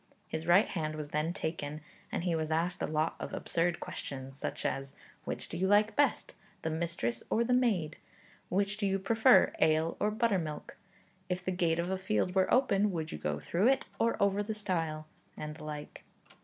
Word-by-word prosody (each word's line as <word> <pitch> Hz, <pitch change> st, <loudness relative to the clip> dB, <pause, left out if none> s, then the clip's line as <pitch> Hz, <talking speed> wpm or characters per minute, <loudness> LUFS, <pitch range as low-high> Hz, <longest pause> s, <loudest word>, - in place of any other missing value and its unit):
His 160 Hz, +1 st, -4 dB
right 180 Hz, +4 st, +6 dB
hand 155 Hz, -4 st, -3 dB
was 150 Hz, -1 st, -5 dB
then 155 Hz, +3 st, 0 dB
taken, 160 Hz, -4 st, -4 dB, 0.3 s
and -, -, -2 dB
he 175 Hz, -2 st, +1 dB
was 160 Hz, -1 st, -1 dB
asked 165 Hz, +3 st, 0 dB
a -, -, 0 dB
lot 155 Hz, +1 st, 0 dB
of -, -, -6 dB
absurd 175 Hz, +1 st, 0 dB
questions, 135 Hz, -1 st, -6 dB
such -, -, -5 dB
as 135 Hz, 0 st, -2 dB, 0.3 s
'Which -, -, -4 dB
do 165 Hz, -, -6 dB
you 190 Hz, +2 st, +1 dB
like 210 Hz, +2 st, +4 dB
best, 290 Hz, -, +2 dB, 0.3 s
the 160 Hz, -, -1 dB
mistress 160 Hz, -8 st, -2 dB
or 230 Hz, -, +3 dB
the 250 Hz, +1 st, +1 dB
maid?' 205 Hz, -12 st, +2 dB, 0.5 s
'Which 200 Hz, +2 st, 0 dB
do 205 Hz, -2 st, 0 dB
you 195 Hz, 0 st, +1 dB
prefer, 225 Hz, +6 st, +5 dB
ale 160 Hz, +1 st, +3 dB
or 210 Hz, -, +2 dB
buttermilk?' 200 Hz, -9 st, -1 dB, 0.5 s
'If 180 Hz, 0 st, -2 dB
the 185 Hz, -, 0 dB
gate 170 Hz, -3 st, +1 dB
of 170 Hz, +2 st, -1 dB
a 190 Hz, -, -1 dB
field 180 Hz, -, 0 dB
were 190 Hz, -1 st, +2 dB
open, 210 Hz, -6 st, +4 dB
would 160 Hz, -3 st, -3 dB
you -, -, -5 dB
go 75 Hz, -1 st, -2 dB
through 175 Hz, -, +1 dB
it, 270 Hz, 0 st, +3 dB
or 230 Hz, 0 st, +2 dB
over 200 Hz, 0 st, +3 dB
the 215 Hz, +1 st, -3 dB
stile?' 165 Hz, -7 st, -2 dB, 0.3 s
and 150 Hz, 0 st, -5 dB
the 155 Hz, -, -9 dB
like. 150 Hz, -1 st, -7 dB
175 Hz, 195 wpm, -32 LUFS, 155-200 Hz, 0.5 s, right